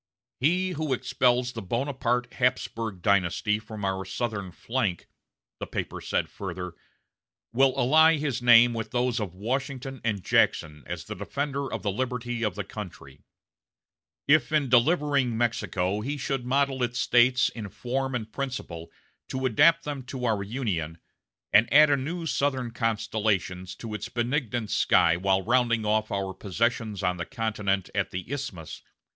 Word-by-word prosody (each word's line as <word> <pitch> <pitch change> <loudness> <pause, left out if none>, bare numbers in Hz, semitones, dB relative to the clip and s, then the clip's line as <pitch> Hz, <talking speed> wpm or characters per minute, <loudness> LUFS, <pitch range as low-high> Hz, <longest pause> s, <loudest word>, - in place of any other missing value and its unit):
'" 125 - -70
"He 180 +7 +2
who 155 -4 -1
expels 125 -1 +1
the 115 - -6
Bonaparte 125 +2 -1
Hapsburg 115 -6 -1
dynasty 100 +2 +2
from 110 -2 -7
our 95 0 -1
southern 100 -1 -4
flank," 110 -3 -2 0.5
the - - -5
paper - - -4
said - - -1
further, 90 -2 -6 0.8
"will 135 +2 +4
ally 160 +5 +5
his 140 -4 -2
name 120 0 +7
with 115 -1 -4
those 125 -1 0
of 95 -5 -4
Washington 130 +4 -3
and 105 -5 -1
Jackson 75 -2 +2
as 85 -2 -6
a - - -4
defender 140 +7 -3
of - - -4
the 100 - 0
liberty 120 +1 -3
of 105 -5 -1
the 100 - -3
country. 85 -9 -9 1.1
If 150 -2 +4
in 150 -4 +2
delivering 140 -2 +3
Mexico 105 -4 0
he 140 +6 -3
should 135 -2 -3
model 135 0 +1
its 120 0 -1
States 125 0 +4
in 105 -3 -7
form 130 +5 -3
and 110 -2 -5
principle 125 -12 -5 0.4
to 130 0 -3
adapt 150 +8 +4
them 145 -2 -4
to 125 -2 -4
our 110 -4 +1
Union, 100 - -3 0.6
and 110 +3 +5
add 150 +1 +7
a - - +5
new 165 +6 -4
southern 135 -5 0
constellation 105 -5 -1
to 115 -2 -7
its 105 +1 -5
benignant 120 -2 -2
sky 85 - +4
while 95 +2 +1
rounding 120 -1 +2
off 110 +1 +1
our 95 -1 -2
possessions 110 +1 -2
on 90 0 +1
the 85 - -4
continent 105 -6 -1
at - - 0
the 90 +7 -6
Isthmus 130 - -5
120 Hz, 155 wpm, -27 LUFS, 100-130 Hz, 1.1 s, name